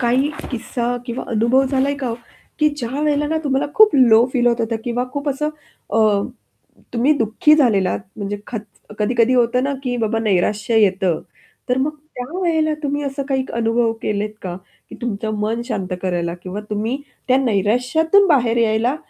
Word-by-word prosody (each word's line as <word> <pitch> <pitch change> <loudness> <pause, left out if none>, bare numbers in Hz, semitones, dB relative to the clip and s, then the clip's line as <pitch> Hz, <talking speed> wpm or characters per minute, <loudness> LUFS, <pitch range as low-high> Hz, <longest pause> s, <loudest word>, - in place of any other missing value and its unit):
काही 255 +4 +2 0.2
किस्सा 245 -1 -2
किंवा 235 +1 -4
अनुभव 235 +4 +3
झालाय 275 +1 +1
का 275 -2 -4
हो? 230 - -2 0.4
की 305 - +4
ज्या 240 -4 -4
वेळेला 295 -1 +1
ना 320 +2 -1
तुम्हाला 270 -1 +1
खूप 430 -7 +6
लो 235 -3 +6
फील 245 -2 +1
होत 235 0 +2
होतं 225 0 -1
किंवा 245 +1 -1
खूप 285 0 -3
असं 290 +2 -1 0.4
अ, 215 -2 +3 0.7
तुम्ही 250 +6 +3
दुःखी 230 +7 +4
झालेलात 210 - +2 0.2
म्हणजे 205 -1 -3
खत 225 - -4 0.4
कधी-कधी 230 +3 +2
होतं 245 0 +2
ना 280 - 0
की 250 -2 -2
बाबा 225 -1 0
नैराश्य 210 +1 +1
येतं. 190 -5 +2 0.5
तर 250 +1 +1
मग 275 +3 +1 0.2
त्या 250 0 -5
वेळेला 320 -3 +1
तुम्ही 290 0 -1
असं 275 0 -3
काही 265 -1 0
अनुभव 230 0 +1
केलेत 210 0 -2
का? 175 -2 -4 0.3
की - - -9
तुमचं 215 -2 -3
मन 225 +3 -1
शांत 210 -7 -3
करायला 175 -2 -1
किंवा 190 +3 -5
तुम्ही 215 +4 -1 0.3
त्या 255 - +5
नैराश्यातून 250 - +2
बाहेर 245 -7 +3
यायला 230 +3 +2
240 Hz, 170 wpm, -20 LUFS, 220-270 Hz, 0.7 s, खूप